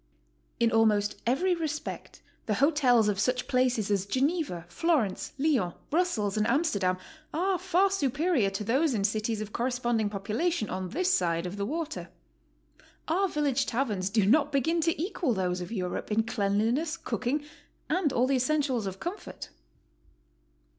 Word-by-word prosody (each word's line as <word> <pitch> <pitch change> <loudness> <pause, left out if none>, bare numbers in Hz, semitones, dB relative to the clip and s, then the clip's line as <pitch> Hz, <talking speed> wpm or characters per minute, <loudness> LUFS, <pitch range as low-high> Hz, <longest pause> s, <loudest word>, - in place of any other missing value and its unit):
In 230 -1 +3
almost 210 -2 +2
every 355 +10 +2
respect 315 -3 -5 0.2
the 210 - +1
hotels 260 -5 +4
of 200 -2 0
such 250 +3 0
places 250 -6 +1
as 200 -1 0
Geneva, 270 - -1
Florence, 235 - 0
Lyons, 270 - +1 0.2
Brussels 265 - +1
and 215 - +2
Am 275 +7 +3
sterdam 190 - 0 0.4
are 370 +2 +1
far 375 +1 +2
superior 290 - +1
to 195 +2 -4
those 265 +6 +2
in 200 - 0
cities 215 +1 0
oI 215 - -10
corresponding 240 -3 0
population 215 - -1
on 185 0 -3
tins 360 - -1
side 170 - +1
of 180 +2 -4
the 200 0 -2
water. 315 +3 -4 1.0
Our 375 +5 +2
village 290 -5 0
taverns 215 -7 -1
do 210 -1 +2
not 285 +7 +4
begin 325 +5 +1
to 330 -1 0
equal 340 - -1
those 180 -1 -1
of 180 - -6
Europe 185 -1 -3
in 220 +1 +3
cleanliness, 230 +8 0
cook 285 -6 -4
ing, 290 +4 +1 0.4
and 320 -3 +1
all 250 -1 +2
the 270 0 +2
essentials 260 -4 0
of 190 0 -6
comfort. 365 +4 -6
245 Hz, 155 wpm, -28 LUFS, 205-310 Hz, 1.0 s, hotels